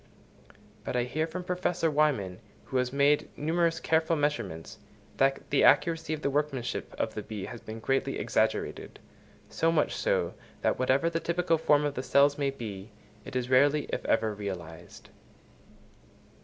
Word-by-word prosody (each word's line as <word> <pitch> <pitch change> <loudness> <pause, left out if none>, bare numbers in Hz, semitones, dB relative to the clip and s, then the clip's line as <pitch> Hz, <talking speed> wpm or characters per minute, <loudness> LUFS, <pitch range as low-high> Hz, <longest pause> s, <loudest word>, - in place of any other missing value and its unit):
But - - -4
I 125 - +2
hear 155 +6 -2
from 180 +3 -6
Professor 180 -2 0
Wyman, 135 -12 +1 0.3
who 130 - -2
has 125 0 0
made 140 +2 +2
numerous 165 +2 +1
careful 160 +1 +2
measurements, 120 - -3 0.4
that 135 0 +1
the 145 - +3
accuracy 165 -2 +3
of 155 -1 -3
the - - +1
workmanship 135 -4 -2
of 110 - -1
the 105 - -4
bee 105 -2 -6
has 120 - -8
been 110 +1 -8
greatly 135 +4 0
exaggerated; - - -1 0.5
so 165 +1 +1
much 155 -2 +1
so, - - 0 0.3
that - - +1
whatever 130 +5 +2
the 165 0 0
typical 170 -1 0
form 150 -1 +3
of 145 - -1
the 130 - -3
cell 140 +2 +4
may 140 -1 +1
be, 110 -6 -7 0.4
it - - -9
is 125 -1 -1
rarely, 145 +3 +4
if - - -2
ever, 110 -1 +1
realised. 90 -5 -8
140 Hz, 160 wpm, -29 LUFS, 115-160 Hz, 0.5 s, cell